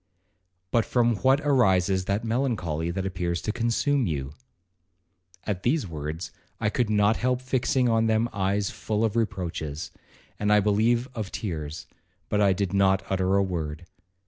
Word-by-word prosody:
But 115 Hz, -, +3 dB
from 120 Hz, -2 st, +2 dB
what 135 Hz, +5 st, +3 dB
arises 95 Hz, -, +3 dB
that 100 Hz, +3 st, -1 dB
melancholy 110 Hz, -, -1 dB
that 95 Hz, +2 st, -3 dB
appears 90 Hz, -2 st, -2 dB
to 105 Hz, -, -1 dB
consume 120 Hz, +3 st, +1 dB
you?' 70 Hz, -3 st, -3 dB, 1.1 s
At 100 Hz, -3 st, -3 dB
these 140 Hz, +5 st, +1 dB
words 80 Hz, 0 st, -5 dB, 0.3 s
I 105 Hz, -, 0 dB
could 120 Hz, -2 st, 0 dB
not 105 Hz, +1 st, +3 dB
help 125 Hz, 0 st, 0 dB
fixing 130 Hz, 0 st, +1 dB
on 115 Hz, -1 st, +2 dB
them 110 Hz, +1 st, +2 dB
eyes 100 Hz, +1 st, 0 dB
full 110 Hz, +1 st, -1 dB
of 110 Hz, -, -2 dB
reproaches, 85 Hz, -9 st, -3 dB, 0.5 s
and 105 Hz, 0 st, +1 dB
I 105 Hz, -, +6 dB
believe 110 Hz, +4 st, +2 dB
of 110 Hz, -5 st, -5 dB
tears,—but 80 Hz, +3 st, -5 dB
I 100 Hz, -1 st, +5 dB
did 95 Hz, 0 st, -1 dB
not 95 Hz, -1 st, +3 dB
utter 95 Hz, 0 st, +1 dB
a 100 Hz, -, +4 dB
word. 80 Hz, -4 st, -4 dB
100 Hz, 150 wpm, -26 LUFS, 90-115 Hz, 1.1 s, I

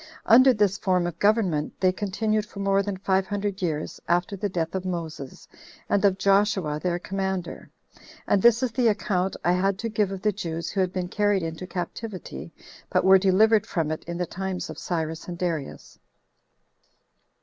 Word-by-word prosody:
Under 255 Hz, +3 st, +7 dB
this 205 Hz, -4 st, +1 dB
form 185 Hz, -3 st, +1 dB
of 175 Hz, -1 st, -5 dB
government 200 Hz, -8 st, +1 dB
they 185 Hz, -1 st, +3 dB
continued 210 Hz, +3 st, -1 dB
for 205 Hz, -1 st, -11 dB
more 195 Hz, 0 st, +2 dB
than 200 Hz, -1 st, -4 dB
five 190 Hz, 0 st, 0 dB
hundred 205 Hz, -1 st, -3 dB
years 155 Hz, -4 st, -3 dB
after 175 Hz, +3 st, +1 dB
the 200 Hz, +1 st, -2 dB
death 165 Hz, -3 st, -2 dB
of 190 Hz, -1 st, -2 dB
Moses, 165 Hz, -7 st, -6 dB, 0.4 s
and 200 Hz, -, +1 dB
of 195 Hz, -2 st, +3 dB
Joshua 195 Hz, -6 st, +2 dB
their 175 Hz, -1 st, 0 dB
commander. 190 Hz, 0 st, -4 dB, 0.6 s
And 200 Hz, -, +2 dB
this 235 Hz, +2 st, +5 dB
is 255 Hz, -, 0 dB
the 240 Hz, 0 st, +2 dB
account 195 Hz, -3 st, 0 dB
I 175 Hz, -, +4 dB
had 190 Hz, +2 st, +1 dB
to 230 Hz, +2 st, -3 dB
give 210 Hz, -2 st, +1 dB
of 195 Hz, -1 st, -6 dB
the 210 Hz, -, +3 dB
Jews 170 Hz, -4 st, -4 dB
who 195 Hz, -, 0 dB
had 185 Hz, -1 st, 0 dB
been 185 Hz, -1 st, -3 dB
carried 205 Hz, -1 st, +1 dB
into 165 Hz, +2 st, -5 dB
captivity, 175 Hz, -, -6 dB, 0.4 s
but -, -, +2 dB
were 190 Hz, 0 st, +7 dB
delivered 210 Hz, +3 st, +4 dB
from 160 Hz, -3 st, -1 dB
it 155 Hz, -, -4 dB
in 170 Hz, 0 st, -5 dB
the 180 Hz, -, -1 dB
times 190 Hz, +1 st, -4 dB
of -, -, -9 dB
Cyrus 160 Hz, -2 st, -3 dB
and 175 Hz, -1 st, -6 dB
Darius. 165 Hz, -6 st, -4 dB
190 Hz, 180 wpm, -25 LUFS, 175-205 Hz, 0.6 s, Under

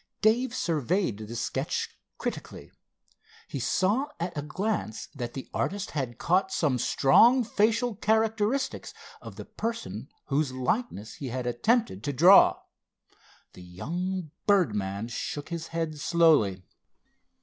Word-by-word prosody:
Dave 240 Hz, +4 st, +3 dB
surveyed 165 Hz, -, 0 dB
the 110 Hz, +2 st, -7 dB
sketch 115 Hz, -, -2 dB, 0.3 s
critically. -, -, -6 dB, 0.8 s
He 140 Hz, -, -5 dB
saw 200 Hz, -, +1 dB
at 170 Hz, 0 st, -3 dB
a 145 Hz, -, -2 dB
glance 155 Hz, -, -3 dB
that 120 Hz, -5 st, -6 dB
the 135 Hz, -, -6 dB
artist 200 Hz, 0 st, -2 dB
had 130 Hz, -6 st, -3 dB
caught 185 Hz, +6 st, +1 dB
some 140 Hz, -6 st, +1 dB
strong 235 Hz, -, +5 dB
facial 230 Hz, +2 st, +1 dB
characteristics 220 Hz, +4 st, 0 dB, 0.3 s
of -, -, -10 dB
the -, -, -8 dB
person 225 Hz, -, -5 dB, 0.2 s
whose 140 Hz, -1 st, 0 dB
likeness 130 Hz, -, -2 dB
he 140 Hz, -, -5 dB
had 125 Hz, 0 st, -4 dB
attempted 120 Hz, -, 0 dB
to 145 Hz, -, -2 dB
draw. 175 Hz, +8 st, +7 dB, 0.9 s
The -, -, -13 dB
young 165 Hz, -, -4 dB, 0.2 s
birdman 105 Hz, -, +1 dB
shook 145 Hz, +5 st, -5 dB
his 170 Hz, -1 st, -5 dB
head 165 Hz, -2 st, -3 dB
slowly. 150 Hz, -, +3 dB
165 Hz, 125 wpm, -27 LUFS, 125-210 Hz, 0.9 s, draw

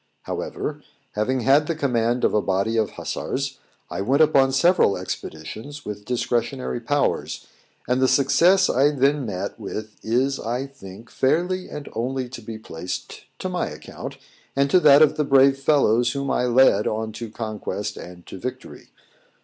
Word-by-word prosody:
However, -, -, -4 dB, 0.3 s
having 125 Hz, +5 st, -1 dB
had 140 Hz, +5 st, +4 dB
the 165 Hz, -, -1 dB
command 120 Hz, -4 st, 0 dB
of -, -, +3 dB
a 105 Hz, -, +3 dB
body 100 Hz, +4 st, 0 dB
of 110 Hz, -2 st, 0 dB
hussars, 135 Hz, 0 st, -4 dB, 0.3 s
I -, -, -4 dB
went 135 Hz, +9 st, +4 dB
upon 135 Hz, -3 st, +4 dB
several 155 Hz, -, +3 dB
expeditions, 95 Hz, -, -7 dB
with 105 Hz, 0 st, -6 dB
discretionary 120 Hz, +1 st, -1 dB
powers; 145 Hz, +5 st, -1 dB, 0.4 s
and 125 Hz, +2 st, +1 dB
the 130 Hz, -, +5 dB
success 165 Hz, +9 st, +4 dB
I 135 Hz, +3 st, +3 dB
then 140 Hz, -1 st, +1 dB
met 95 Hz, -3 st, -4 dB
with 110 Hz, 0 st, -6 dB
is, 130 Hz, +5 st, 0 dB
I 120 Hz, +4 st, -2 dB
think, 115 Hz, -4 st, -12 dB
fairly 180 Hz, +7 st, 0 dB
and 150 Hz, -, -7 dB
only 125 Hz, +2 st, -2 dB
to 120 Hz, -1 st, -9 dB
be 110 Hz, 0 st, -7 dB
placed 90 Hz, -4 st, -7 dB
to -, -, -4 dB
my -, -, -2 dB
account, -, -, -8 dB, 0.4 s
and 140 Hz, 0 st, +2 dB
to 185 Hz, -, +6 dB
that 150 Hz, -2 st, +7 dB
of 155 Hz, -, +2 dB
the 150 Hz, -, +2 dB
brave 135 Hz, -1 st, +4 dB
fellows 125 Hz, -5 st, +3 dB
whom 140 Hz, -1 st, -2 dB
I 125 Hz, -, +1 dB
led 125 Hz, -3 st, +4 dB
on 110 Hz, 0 st, -2 dB
to 115 Hz, +1 st, -7 dB
conquest 105 Hz, -2 st, -4 dB
and 90 Hz, 0 st, -11 dB
to 95 Hz, -, -9 dB
victory. 130 Hz, +5 st, -7 dB
125 Hz, 165 wpm, -23 LUFS, 110-140 Hz, 0.4 s, that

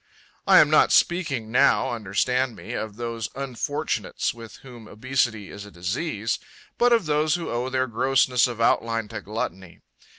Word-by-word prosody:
I -, -, +7 dB
am -, -, +6 dB
not -, -, +5 dB
speaking 140 Hz, -11 st, +1 dB
now, 125 Hz, -, +3 dB
understand 120 Hz, +3 st, -1 dB
me, -, -, -8 dB
of 110 Hz, -2 st, -4 dB
those 115 Hz, -1 st, -4 dB
unfortunates 140 Hz, +3 st, -3 dB
with 115 Hz, -2 st, -11 dB
whom 120 Hz, -4 st, -12 dB
obesity 115 Hz, -3 st, -2 dB
is 100 Hz, -, -9 dB
a 105 Hz, -, -11 dB
disease, 105 Hz, -, -3 dB, 0.4 s
but 245 Hz, 0 st, +4 dB
of 230 Hz, -6 st, +3 dB
those 150 Hz, +1 st, +1 dB
who 175 Hz, -1 st, -4 dB
owe 120 Hz, +2 st, -2 dB
their 130 Hz, 0 st, 0 dB
grossness 125 Hz, +1 st, +2 dB
of 120 Hz, -2 st, -7 dB
outline 115 Hz, -1 st, +1 dB
to -, -, -6 dB
gluttony. 95 Hz, -4 st, -6 dB
120 Hz, 160 wpm, -24 LUFS, 110-135 Hz, 0.4 s, I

